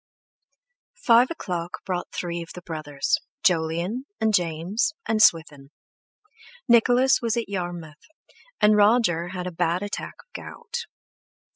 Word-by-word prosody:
Five 240 +1 +5
o'clock 180 - -5
brought 180 -2 -3
three 170 -1 -4
of 165 - -9
the 180 - -9
brothers, 155 -4 -2 0.2
Jolyon 175 +8 0
and 220 -1 +1
James 180 - 0
and 220 -1 +1
Swithin; 150 -6 +3 1.0
Nicholas 245 +2 +4
was 230 -1 0
at 235 - -2
Yarmouth, 175 -5 -6 0.5
and 210 0 +5
Roger 205 -5 +3
had 180 0 -5
a 180 - -4
bad 175 +2 0
attack 205 - -5
of - - -59
gout. 470 0 -7
180 Hz, 125 wpm, -24 LUFS, 170-230 Hz, 1.0 s, Five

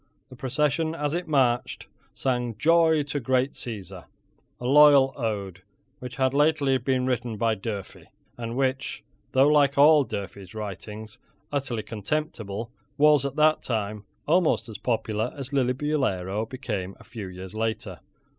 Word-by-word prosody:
The 130 - -12
procession, 150 +5 0
as 150 -2 -2
it 175 0 -2
marched, 130 -5 +1 0.3
sang 125 -4 -1
"Joy 160 +2 +4
to 145 0 -3
Great 130 +1 +1
Caesar," 95 -6 -7 0.5
a 120 - -7
loyal 140 0 +6
ode, 100 -7 -3 0.4
which 125 -1 -7
had 130 -1 +1
lately 145 -2 +3
been 125 0 0
written 120 -3 -2
by 115 +1 +2
Durfey, 100 -2 -6 0.3
and 115 0 -5
which, 135 0 -1 0.3
though 135 +2 +5
like 145 -2 +4
all 150 +1 +7
Durfey's 100 -4 -7
writings, 105 +1 -7 0.3
utterly 135 -6 -2
contemptible, 110 -2 -4 0.3
was, 150 -2 +5
at 140 - -3
that 155 0 +4
time, 105 -3 -3 0.2
almost 160 -7 +2
as 105 - -8
popular 110 -1 -1
as 135 -2 -5
Lillibullero 125 -7 0
became 105 -8 -4
a - - -14
few 105 -5 -8
years 95 0 -9
later. 110 0 -3
125 Hz, 140 wpm, -26 LUFS, 110-145 Hz, 0.5 s, all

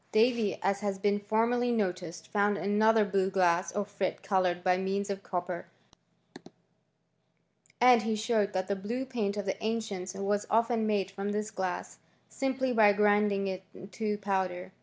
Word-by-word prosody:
Davy, 230 -1 +2
as 195 +1 +1
has 200 -1 -2
been 205 +1 +1
formerly 230 +4 +1
noticed, 180 -6 -2
found 205 0 +1
anothef 210 +1 +3
blue 195 -1 +2
glass, 180 -2 +2
or 205 -1 -2
frit, 200 -1 -3
coloured 180 -2 +1
by 185 -1 +3
means 195 +2 -2
of 195 0 -4
copper; 180 -2 -4 2.1
and 245 -1 +6
he 225 -1 -1
showed 215 -2 0
that 185 0 -1
the 200 - 0
blue 230 +7 -4
paint 215 -6 -2
of 205 - -3
the 190 - -3
ancients 210 -4 -3
wai 200 +1 0
often 230 0 +2
made 200 -3 0
from 200 +1 -3
this 210 +1 -2
glass, 190 -3 -4 0.3
simply 260 -1 -1
by 215 -3 +6
grinding 205 -1 +2
it 190 -1 -4 0.3
to 210 +2 -2
powder. 190 -2 -2
205 Hz, 160 wpm, -30 LUFS, 190-220 Hz, 2.1 s, and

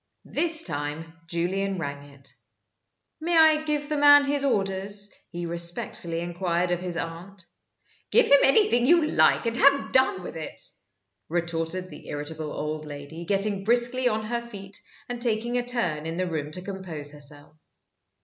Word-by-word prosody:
This 330 -1 +2
time 150 +1 -5
Julian 190 +4 -1
rang 145 -3 -6
it. 140 0 -15 0.9
"May 335 +1 +1
I 315 -1 +5
give 300 -1 -2
the 305 0 -2
man 290 0 +8
his 280 0 0
orders?" 200 -3 -1 0.2
he 175 0 -5
respectfully 170 0 -1
inquired 175 0 -1
of 175 0 -1
his 180 -2 -4
aunt. 175 +3 -7 0.6
"Give 475 - +6
him 280 - +6
anything 260 - +4
you 335 0 +5
like, - - +3
and 230 0 -1
have 280 +2 +4
done 260 -8 +3
with - - -8
it!" 160 - -7 0.7
retorted 170 +2 -2
the 150 - -12
irritable 150 +1 -5
old 155 0 -4
lady, 145 +3 -8
getting 200 +1 +1
briskly 245 +3 +2
on 215 -1 -2
her 235 +2 -2
feet, 200 -5 -9 0.3
and 245 -1 -5
taking 235 +1 +1
a - - -2
turn 175 -11 0
in 165 +1 -4
the 185 - 0
room 155 -4 -3
to 180 - -3
compose 180 -7 -6
herself. 145 +1 -7
185 Hz, 160 wpm, -26 LUFS, 165-240 Hz, 0.9 s, man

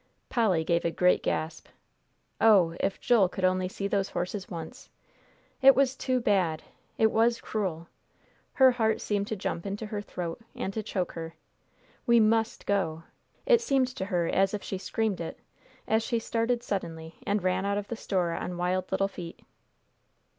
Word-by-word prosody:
Polly 205 -9 +2
gave 170 +1 +1
a 170 - +1
great 180 +2 +3
gasp. 160 0 -3 0.7
"Oh, 190 -7 +5
if 195 - -1
Joel 215 -7 +4
could 185 0 -2
only 185 0 +1
see 195 +1 -3
those 200 -1 0
horses 185 +2 -4
once! 165 -3 -8 0.7
It 270 0 +8
was 265 -1 +2
too 255 -1 0
bad 185 -8 +1 0.3
it 220 -3 +4
was 230 +1 +3
cruel." 175 -6 -3 0.7
Her 265 -1 +6
heart 220 -3 +1
seemed 205 -1 -1
to 220 - -2
jump 180 -3 -3
into 200 +2 -4
her 210 -1 -4
throat, 175 -2 -5
and 195 - -3
to 220 - -2
choke 190 -3 -2
her. 165 -1 -7 0.7
"We 235 -1 +6
must 225 +1 +2
go!" 165 -5 0 0.4
It 475 -2 +5
seemed 270 - +2
to 220 -6 -5
her 180 -4 0
as 195 +3 +2
if 205 - -6
she 190 - -4
screamed 215 -2 -1
it, 165 - -5 0.5
as 220 +1 +3
she 230 +1 -1
started 230 +1 -1
suddenly 165 -6 -5
and 205 -1 +1
ran 185 +1 +1
out 200 0 0
of 205 0 -4
the 235 - -4
store 185 -6 -1
on 175 +1 -4
wild 180 +1 -1
little 195 +1 +2
feet. 175 -4 -9
195 Hz, 175 wpm, -28 LUFS, 180-225 Hz, 0.7 s, It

